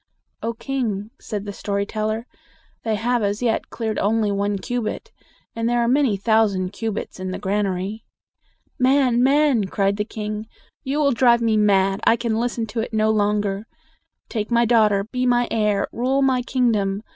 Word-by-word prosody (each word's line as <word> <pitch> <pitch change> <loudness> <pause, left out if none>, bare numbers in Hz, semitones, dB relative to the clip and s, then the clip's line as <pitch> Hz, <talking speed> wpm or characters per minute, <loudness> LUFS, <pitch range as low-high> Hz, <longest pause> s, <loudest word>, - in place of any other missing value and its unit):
"O 230 +1 -2
king!" 225 -4 -3
said 210 -2 -5
the 205 - -5
story 200 0 -2
teller, 215 +2 -2 0.6
"they 220 -2 -1
have 240 +3 0
as 205 +3 -1
yet 230 -2 0
cleared 220 -2 -3
only 215 0 +1
one 200 0 0
cubit; 235 +2 -4 0.4
and 230 0 -1
there 240 - +1
are 235 - +2
many 255 -4 +2
thousand 200 -3 +1
cubits 220 -4 -4
in 185 0 -4
the 185 - -4
granary." 200 +1 -2 0.8
"Man, 255 -2 +3
man!" 275 -4 +3
cried 195 +1 0
the 210 - 0
king, 215 0 -5 0.4
"you 270 +2 -2
will 290 -2 +3
drive 240 -1 +4
me 225 -1 +2
mad. 195 -2 +3
I - - +5
can 230 -1 -1
listen 235 -1 -1
to 225 +2 -5
it 225 0 -3
no 215 0 +3
longer. 205 0 0 0.6
Take 215 -3 -3
my 235 0 +3
daughter; 215 -4 +3
be 250 +4 -2
my 245 -1 +3
heir; 210 -3 +1
rule 265 +3 +1
my 260 -2 +2
kingdom. 220 -6 0
220 Hz, 170 wpm, -22 LUFS, 205-240 Hz, 0.8 s, I